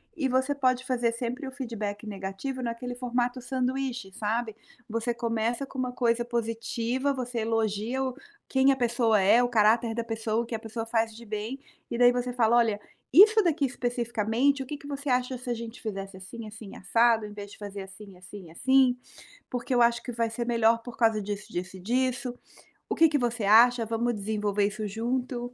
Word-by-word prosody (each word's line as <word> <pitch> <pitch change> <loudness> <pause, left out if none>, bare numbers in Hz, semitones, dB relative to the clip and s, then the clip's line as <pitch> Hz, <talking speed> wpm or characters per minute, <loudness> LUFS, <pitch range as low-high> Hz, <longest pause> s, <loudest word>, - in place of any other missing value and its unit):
e 290 -5 0
você 260 +3 +1
pode 255 -2 +1
fazer 240 -3 +1
sempre 245 +4 -4
o 265 - -6
feedback 225 -6 -5
negativo 200 +7 -5
naquele 245 +1 -4
formato 245 0 -1
sanduíche 255 -4 -2
sabe? 220 +2 -2 0.3
Você 230 +2 -1
começa 230 +1 -1
com 270 - -12
uma 250 -1 -1
coisa 240 -1 +1
positiva, 235 +3 -1
você 250 -2 -3
elogia 225 +2 -1
o 260 -1 -3 0.3
quem 265 +1 +4
a - - +2
pessoa 235 -3 +2
é, 210 +5 +5
o 245 - +1
caráter 225 0 +3
da 235 - -1
pessoa, 225 0 -1
o - - -8
que 230 - -4
a 220 - -4
pessoa 225 0 -5
faz 225 -1 0
de 235 - -11
bem, 215 +5 -4 0.3
e 235 - -1
daí 245 0 +7
você 245 0 -1
fala: 235 -1 +3
"Olha, 225 -3 +2 0.3
isso 430 +7 +8
daqui 315 -5 +2
especificamente 245 +1 0
o - - -11
que 295 - -5
que 285 - -12
você 285 0 -5
acha 250 0 +1
se 250 0 -8
a - - +1
gente 230 0 -7
fizesse 195 -3 -5
assim, 220 +4 -9
assim 215 -1 -10
e - - -11
assado, 230 +3 +3
em 210 - -8
vez 205 -1 -8
de - - -12
fazer 205 -1 -7
assim, 195 0 -12
assim 180 +1 -11
e 160 - -14
assim? 260 +5 +3 0.5
Porque 245 +1 -2
eu 245 - +3
acho 235 0 +3
que 245 - -5
vai 230 0 0
ser 235 +1 -3
melhor 230 -1 +3
por 245 0 -9
causa 225 -2 +3
disso, 205 0 -5
disso 185 +2 -4
e - - -10
disso. 250 +4 0 0.6
O - - 0
que 325 - +6
que 295 - +2
você 240 -3 -1
acha? 235 +3 +6
Vamos 230 +1 -1
desenvolver 205 0 0
isso 210 +1 -4
junto?" 245 +3 -3
235 Hz, 205 wpm, -27 LUFS, 220-250 Hz, 0.6 s, isso